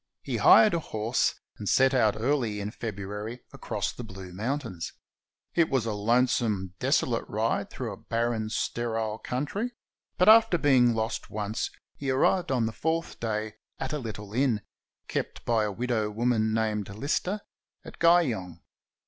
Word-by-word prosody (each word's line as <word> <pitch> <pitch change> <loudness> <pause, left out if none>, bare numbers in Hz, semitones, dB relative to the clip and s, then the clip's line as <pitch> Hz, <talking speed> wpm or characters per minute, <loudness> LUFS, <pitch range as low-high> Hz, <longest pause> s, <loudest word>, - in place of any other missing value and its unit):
He - - -2
hired 215 - +7
a 170 - +2
horse 110 -5 0 0.2
and 105 - -3
set 135 0 +4
out 110 -5 +3
early 120 -4 0
in 100 +1 -4
February 105 +2 -5
across - - -3
the 120 - -7
Blue 95 -4 -9
Mountains. 115 - -3 0.6
It 170 -2 +3
was 130 -5 +1
a 110 - -1
lonesome, 110 -3 +1
desolate - - +1
ride - - -1
through - - -5
a - - -10
barren, 115 -1 -1
sterile 110 -1 -2
country; 195 - -3 0.4
but 180 - +3
after 220 -4 +7
being 130 -6 +4
lost 110 +1 -2
once 105 +1 -2 0.3
he 140 - -3
arrived 140 +6 +2
on 125 -4 +2
the 110 - -1
fourth 160 +7 -2
day 110 -1 -3 0.2
at 135 +2 -4
a 150 - -1
little 105 -4 -7
inn, 120 -4 +2 0.5
kept - - -4
by 115 -2 +2
a 105 - -2
widow 115 0 -1
woman 110 0 +1
named 110 -2 0
Lister, 145 - -2 0.4
at - - -11
Guyong. 120 - +3
115 Hz, 155 wpm, -28 LUFS, 105-135 Hz, 0.6 s, hired